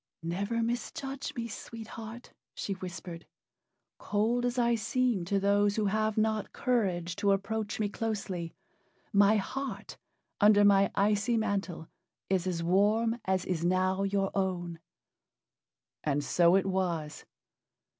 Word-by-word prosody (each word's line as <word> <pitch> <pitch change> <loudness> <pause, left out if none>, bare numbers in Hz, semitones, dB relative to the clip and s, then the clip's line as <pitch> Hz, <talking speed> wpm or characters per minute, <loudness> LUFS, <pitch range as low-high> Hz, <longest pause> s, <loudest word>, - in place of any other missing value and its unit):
"Never 200 +7 -1
misjudge 270 +3 -4
me, 230 -1 -3
Sweet 225 0 -8
Heart," 225 +2 -9 0.2
she 200 - -3
whispered. 175 -2 -8 0.7
"Cold 225 +4 0
as 245 +1 -3
I 235 -1 +3
seem 235 -4 0
to 195 +2 +1
those 200 +1 +2
who 215 - 0
have 215 +2 0
not 215 -1 0
courage 185 -9 0
to 200 -1 +3
approach 205 +2 -2
me 210 - +1
closely, 200 -6 -4 0.6
my 200 +1 +5
heart, 270 +7 -4 0.4
under 205 -1 +6
my 200 -1 +5
icy 210 +4 +2
mantle, 195 -6 -2 0.4
is 185 -1 +1
as 170 -2 -2
warm 215 +6 +2
as 190 -1 0
is 170 -3 -2
now 185 +2 +1
your 195 0 0
own." 175 -3 -2 1.2
And 145 -1 0
so 170 +5 +4
it 195 - +3
was. 175 -5 -2
200 Hz, 130 wpm, -30 LUFS, 185-220 Hz, 1.2 s, under